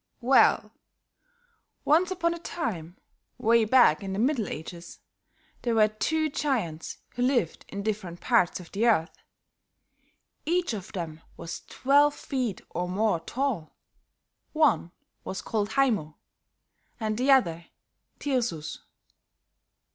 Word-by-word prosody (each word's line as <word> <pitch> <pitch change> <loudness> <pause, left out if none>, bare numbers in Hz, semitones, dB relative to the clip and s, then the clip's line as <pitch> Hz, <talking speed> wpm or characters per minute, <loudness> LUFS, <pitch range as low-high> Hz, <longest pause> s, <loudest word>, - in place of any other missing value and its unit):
"Well, 260 +3 +4 1.1
once 335 +5 +4
upon 340 -2 0
a 340 - -7
time, 190 - -4 0.4
way 230 0 +4
back 235 -9 +5
in 195 -1 -4
the - - -3
Middle 240 -2 +1
Ages, 170 +2 -8 0.6
there 235 -2 0
were 215 -1 +5
two 310 +9 0
giants 230 - -2
who 245 - -5
lived 245 - +1
in 200 0 -5
different 200 -5 -3
parts 230 -9 +2
of 175 - -12
the 220 +4 +1
earth. 175 -7 +2 1.3
Each 345 -4 0
of 195 -3 -6
them 165 -4 -5 0.2
was 170 0 -6
twelve 285 +2 +3
feet 250 -8 -3
or 180 +1 -3
more 200 -1 +1
tall; 230 - -3 0.8
one 305 - +2 0.3
was 190 - -5
called 215 -1 -2
Haymo 215 - +1 0.8
and 215 -1 -1
the 255 +5 0
other 170 -11 +3 0.5
Tirsus. 235 - -2
220 Hz, 120 wpm, -27 LUFS, 175-270 Hz, 1.3 s, back